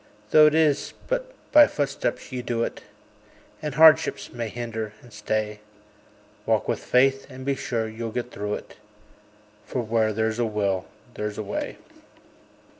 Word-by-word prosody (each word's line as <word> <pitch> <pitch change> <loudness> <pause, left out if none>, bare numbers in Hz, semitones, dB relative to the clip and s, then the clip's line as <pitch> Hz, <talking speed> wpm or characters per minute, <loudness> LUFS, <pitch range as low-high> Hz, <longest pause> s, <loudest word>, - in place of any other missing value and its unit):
Though 155 0 +8
it 150 - +2
is 155 -3 +2
but - - -2 0.2
by 295 -1 +8
footsteps 145 -1 -2
ye 125 -1 -3
do 120 -1 -1
it, - - -4 0.8
And 150 -2 -4
hardships 155 -9 +5
may 120 -2 -3
hinder 110 -2 -5
and 120 -3 -16
stay; 105 0 -2 0.9
Walk - - +2
with - - 0
faith, 135 +2 +3
and 130 -1 -9
be 140 - +1
sure 115 -4 -2
you'll 115 +1 -5
get 125 +2 -4
through 105 +1 -3
it; - - -11 0.9
For 125 - -3
"Where 110 -1 +1
there's 110 +1 -1
a 120 - +2
will 100 -4 -1 0.3
there's 105 -1 -4
a 110 - -3
way." 100 - -4
115 Hz, 155 wpm, -25 LUFS, 110-135 Hz, 0.9 s, Though